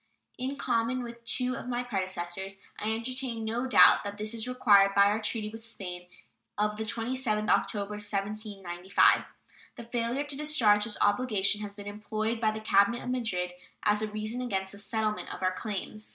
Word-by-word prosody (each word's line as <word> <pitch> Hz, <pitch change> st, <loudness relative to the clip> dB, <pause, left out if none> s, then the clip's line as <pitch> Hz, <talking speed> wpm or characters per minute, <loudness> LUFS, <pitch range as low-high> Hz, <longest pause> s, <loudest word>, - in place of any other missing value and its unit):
In 260 Hz, +2 st, -2 dB
common 240 Hz, 0 st, 0 dB
with 235 Hz, 0 st, -9 dB
two 250 Hz, +2 st, +1 dB
of 265 Hz, -, -7 dB
my 245 Hz, 0 st, -1 dB
predecessors, 190 Hz, -3 st, -3 dB, 0.2 s
I 215 Hz, +1 st, -1 dB
entertain 235 Hz, 0 st, -3 dB
no 235 Hz, +4 st, -1 dB
doubt 255 Hz, -, +7 dB
that 205 Hz, 0 st, -5 dB
this 215 Hz, +1 st, -1 dB
is 230 Hz, +1 st, -2 dB
required 200 Hz, -6 st, +5 dB
by 200 Hz, -, +7 dB
our 210 Hz, +2 st, +2 dB
treaty 215 Hz, 0 st, -2 dB
with 225 Hz, +1 st, -9 dB
Spain 180 Hz, -5 st, -6 dB, 0.5 s
of 210 Hz, 0 st, 0 dB
the 220 Hz, -, -3 dB
27th 225 Hz, -1 st, -1 dB
October, 200 Hz, +1 st, +1 dB
1795. 200 Hz, -3 st, +1 dB, 0.5 s
The 235 Hz, -, -8 dB
failure 235 Hz, +3 st, -1 dB
to 290 Hz, -1 st, -6 dB
discharge 240 Hz, -9 st, +3 dB
this 215 Hz, -2 st, -5 dB
obligation 205 Hz, -1 st, +2 dB
has 205 Hz, -1 st, -6 dB
been 205 Hz, -1 st, -9 dB
employed 215 Hz, +2 st, -3 dB
by 220 Hz, -, +3 dB
the 215 Hz, 0 st, -3 dB
cabinet 215 Hz, +3 st, +3 dB
of 250 Hz, -, -3 dB
Madrid 190 Hz, -8 st, -1 dB, 0.3 s
as 210 Hz, 0 st, +3 dB
a 215 Hz, -, 0 dB
reason 215 Hz, +3 st, -3 dB
against 190 Hz, -6 st, -2 dB
the 200 Hz, -, -8 dB
settlement 215 Hz, +1 st, -2 dB
of -, -, -7 dB
our 185 Hz, 0 st, +2 dB
claims. 215 Hz, +1 st, -5 dB
215 Hz, 180 wpm, -29 LUFS, 200-235 Hz, 0.5 s, doubt